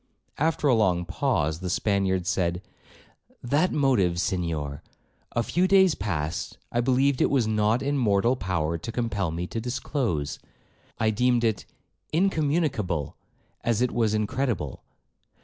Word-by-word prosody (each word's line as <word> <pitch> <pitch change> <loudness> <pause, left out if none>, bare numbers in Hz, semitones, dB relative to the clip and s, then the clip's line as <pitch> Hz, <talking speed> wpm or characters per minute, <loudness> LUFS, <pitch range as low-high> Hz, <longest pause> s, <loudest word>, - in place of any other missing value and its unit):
After 155 0 +1
a 130 - +5
long 90 -6 +2
pause, 80 -2 0
the 90 0 -4
Spaniard 95 -2 +1
said, 90 -1 0 0.8
'That 145 +9 +2
motive, 115 - +2
Senhor, 80 -6 -2 0.5
a 120 - +1
few 180 +9 +1
days 190 -3 +5
past 85 - -3
I 120 - +1
believed 130 +2 +2
it - - +4
was 135 -5 +2
not 110 +3 +1
in 140 0 0
mortal 115 +1 +3
power 85 -6 -1
to 115 - -6
compel 110 -6 -1
me 85 +2 -3
to 115 +5 -4
disclose. 120 - -2 0.6
I 110 - +2
deemed 120 +2 +2
it 110 -3 0 0.5
incommunicable 150 - 0 0.5
as 115 -2 +1
it 125 - 0
was 110 -3 +1
incredible. 110 - -2
110 Hz, 135 wpm, -26 LUFS, 90-130 Hz, 0.8 s, a